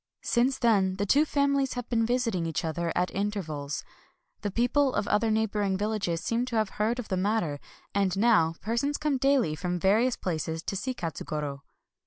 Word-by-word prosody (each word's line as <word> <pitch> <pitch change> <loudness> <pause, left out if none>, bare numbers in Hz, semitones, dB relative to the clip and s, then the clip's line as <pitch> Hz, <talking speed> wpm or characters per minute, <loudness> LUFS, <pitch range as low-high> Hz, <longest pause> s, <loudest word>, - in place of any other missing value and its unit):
Since 255 +2 +2
then 200 -6 +3
the 200 +1 -1
two 285 +9 +4
families 280 -2 +1
have 245 -1 -5
been 230 -2 +1
visiting 230 -9 0
each 165 0 -2
other 165 +1 -2
at 180 - +1
inter 205 0 -1
vals. 145 -2 -5 0.6
The 205 - -1
people 250 +6 +2
of 205 - 0
other 215 +2 +2
neighboring 210 -3 +1
vil 210 +2 -1
lages 180 -6 -1
seem 230 +4 0
to 245 - -4
have 215 -2 +1
heard 225 +3 +1
of 245 - -6
the 190 - 0
matter; 185 -7 0 0.3
and 195 -2 +1
now 200 -7 +4
persons 235 +7 -1
come 300 -3 0
daily 270 - +2
from 180 +2 -2
various 220 +7 +3
places 160 -2 -3
to - - -3
see 255 +6 -3
Katsugoro. 150 - -4
210 Hz, 190 wpm, -28 LUFS, 180-240 Hz, 0.6 s, two